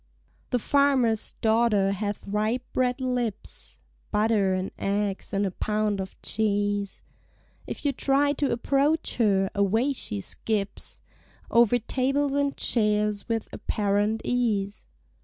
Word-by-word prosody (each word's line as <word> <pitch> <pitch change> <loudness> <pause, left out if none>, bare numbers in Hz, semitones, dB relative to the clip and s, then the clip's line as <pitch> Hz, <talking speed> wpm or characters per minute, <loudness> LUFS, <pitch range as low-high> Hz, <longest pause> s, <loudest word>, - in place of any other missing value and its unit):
The 250 - +2
farmer's 255 -4 +2
daughter 220 -3 +3
hath 205 +1 -3
ripe 215 +5 0
red 250 0 +1
lips; 245 -5 -4 0.3
(Butter 210 -3 +2
and 185 +1 -3
eggs 200 0 -1
and 200 +1 +1
a 190 - -1
pound 210 +1 -1
of 190 -1 -6
cheese) 205 -2 -1 0.6
If - - -6
you 285 - +3
try 280 +2 +2
to 285 -1 0
approach 280 +6 +1
her, 195 -4 +2
away 220 +7 +2
she 105 - -4
skips 200 - -3 0.5
Over 235 0 +5
tables 270 +4 0
and 280 0 0
chairs 210 -1 +1
with 225 -1 -1
apparent 205 +1 0
ease. 215 -5 -1
220 Hz, 120 wpm, -26 LUFS, 205-250 Hz, 0.6 s, Over